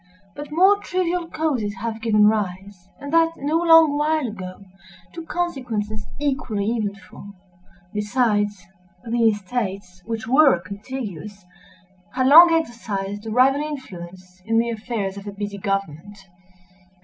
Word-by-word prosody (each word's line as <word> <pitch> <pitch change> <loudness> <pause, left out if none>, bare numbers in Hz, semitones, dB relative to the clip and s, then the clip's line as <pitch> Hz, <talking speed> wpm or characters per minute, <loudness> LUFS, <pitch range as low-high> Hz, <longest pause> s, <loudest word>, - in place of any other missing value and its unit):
But 290 0 -8
more 380 +6 +5
trivial 360 -3 -2
causes 265 -12 -2
have 225 -1 -5
given 210 -2 +3
rise—and 200 - -3
that 330 0 +4
no 295 +4 0
long 325 -3 +6
while 310 -1 +1
ago—to 190 - -11
consequences 235 -11 -3
equally 250 -8 -1
eventful. 205 -2 -6 0.6
Besides, 210 -3 0 0.4
the 230 0 +3
estates, 195 -3 -4
which 225 -1 -4
were 270 - +5
contiguous, 205 -1 -8 0.7
had 255 0 +1
long 330 +5 +9
exercised 220 -9 -3
a - - -3
rival 260 +5 +3
influence 185 - -8
in 225 +3 0
the 235 +1 +1
affairs 215 -3 -4
of 200 +1 -9
a - - -4
busy 200 0 -6
government. 195 -1 -3
220 Hz, 120 wpm, -22 LUFS, 200-285 Hz, 0.7 s, long